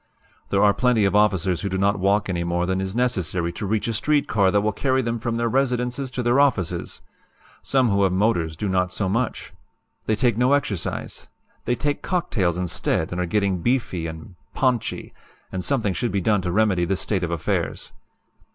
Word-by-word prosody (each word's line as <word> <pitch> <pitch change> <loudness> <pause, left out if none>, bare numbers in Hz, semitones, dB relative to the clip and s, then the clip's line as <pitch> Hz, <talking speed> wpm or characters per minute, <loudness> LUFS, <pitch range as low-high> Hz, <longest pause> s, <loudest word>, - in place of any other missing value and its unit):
"There 100 0 +2
are 100 -1 +5
plenty 125 -4 +2
of 100 - +1
officers 95 -4 +2
who 100 - -2
do 95 - -2
not 100 +1 +1
walk 100 +2 +2
any 85 -2 -1
more 85 +1 0
than 95 +1 -1
is 95 +1 -4
necessary 90 -8 0
to 105 - -5
reach 110 +2 0
a 115 - -1
street 145 +6 +1
car 100 -3 +3
that 100 +1 +2
will 105 +1 +1
carry 130 +4 0
them 115 0 -2
from 115 +1 -2
their 115 0 0
residences 125 +1 0
to 125 0 -4
their 120 +3 +3
offices. 130 - 0 0.6
Some 130 -3 +2
who 100 -1 +2
have 95 -1 +3
motors 90 -5 0
do 105 - -2
not 90 -1 +1
do - - -10
so 100 - -1
much. 115 +5 -2 0.5
They 110 - +2
take 115 0 +1
no 125 +3 +4
exercise. 110 -10 -3 0.4
They 120 - +1
take 145 +3 -2
cocktails 100 - 0
instead 90 -2 -1
and 90 +1 -2
are 90 - -1
getting 100 -2 0
beefy 105 -8 0
and 80 +4 -9 0.2
'ponchy,' 125 -4 -1 0.4
and 95 -1 -3
something 115 -7 +1
should 120 +5 -2
be 100 - 0
done 105 +1 +2
to 90 -1 -2
remedy 100 -3 +2
this 95 +2 -1
state 95 -4 -1
of 85 - -1
affairs. 85 -3 -2
100 Hz, 205 wpm, -23 LUFS, 90-120 Hz, 0.6 s, are